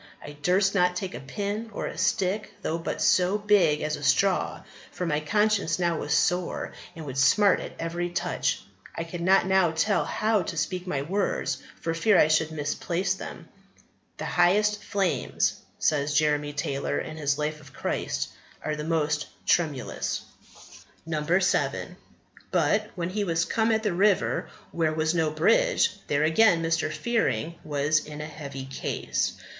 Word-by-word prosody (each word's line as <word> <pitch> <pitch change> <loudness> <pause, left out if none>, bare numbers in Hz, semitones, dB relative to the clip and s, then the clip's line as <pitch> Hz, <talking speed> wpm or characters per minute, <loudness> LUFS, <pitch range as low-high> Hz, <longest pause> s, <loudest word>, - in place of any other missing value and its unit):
I 145 - -9
durst 180 +7 +1
not 180 -2 +3
take 185 0 -4
a - - -6
pin 205 +10 -4
or - - -4
a - - -5
stick, 205 +1 0
though 165 +1 -1
but 165 - -3
so 185 +3 +3
big 205 -8 +3
as 155 0 -1
a - - -9
straw, 190 +6 +2 0.3
for 180 - -4
my 150 -3 +1
conscience 205 +2 +1
now 170 -2 0
was 150 - -4
sore 180 +3 0 0.2
and 160 -2 -8
would 135 -1 -4
smart 190 +10 +5
at - - -7
every 170 +1 -2
touch. 175 - -1 0.3
I 165 - -2
could 170 +1 -7
not 190 +3 +4
now 190 -2 +4
tell 165 +6 +1
how 215 -1 +1
to 170 - -5
speak 180 +4 -2
my 140 -5 -1
words 195 +6 -1 0.2
for 165 - -1
fear 195 +4 +3
I 155 - +5
should 155 0 +3
misplace 170 +5 -1
them." 190 - -8 0.7
"The - - -5
highest 205 +4 +2
flames," 195 -4 0 0.2
says 145 -1 +1
Jeremy 150 -1 +2
Taylor 140 -1 -2
in 155 0 -5
his 145 -2 0
Life 150 0 -2
of 140 -2 -15
Christ, - - -2 0.4
"are 155 - -1
the 150 - -5
most 150 -2 0 0.2
tremulous." 150 -7 0 1.2
7. 185 - 0 0.5
"But 210 0 +1
when 175 -1 -3
he 210 +2 -1
was 165 -3 +1
come 225 0 +1
at 220 0 +1
the 210 -4 0
river 195 +2 +2 0.2
where 160 -2 0
was 155 +1 +1
no 165 -2 +2
bridge, - - +3 0.2
there, 145 +1 +1
again, 165 +2 +4
Mr. 165 -1 0
Fearing 225 -8 0
was 150 +1 +1
in 150 0 -9
a 150 - -4
heavy 140 -3 -7
case. 135 - -2
170 Hz, 165 wpm, -26 LUFS, 150-195 Hz, 1.2 s, smart